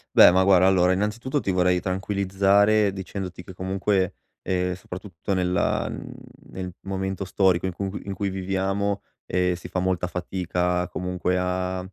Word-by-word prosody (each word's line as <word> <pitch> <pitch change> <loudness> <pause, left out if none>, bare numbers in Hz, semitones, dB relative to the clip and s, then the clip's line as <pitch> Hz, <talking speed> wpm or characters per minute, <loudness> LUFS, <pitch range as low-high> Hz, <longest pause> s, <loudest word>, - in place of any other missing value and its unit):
Beh, - - +10
ma 95 +1 +4
guarda, 95 -1 +5
allora, 90 -1 +4
innanzitutto 115 +8 -1
ti 100 - -3
vorrei 90 -1 +3
tranquillizzare 100 +2 +2
dicendoti 95 -1 -6
che 95 - -11
comunque, 95 0 0 0.3
ehm, 90 -1 0
soprattutto 95 0 -6
nella, 90 -1 +1
mhmm, - - -7 0.4
nel 90 -1 -5
momento 95 0 -3
storico, 95 -1 +2
in 95 - -1
cu 95 +1 -3
in 100 - -5
cui 100 +1 -2
viviamo, 95 +1 -1 0.2
ehm, 90 0 +1
si 85 - -9
fa 95 - -1
molta 90 -1 0
fatica 90 0 -1
comunque 90 0 -2
a 90 0 -1
95 Hz, 150 wpm, -25 LUFS, 90-95 Hz, 0.4 s, Beh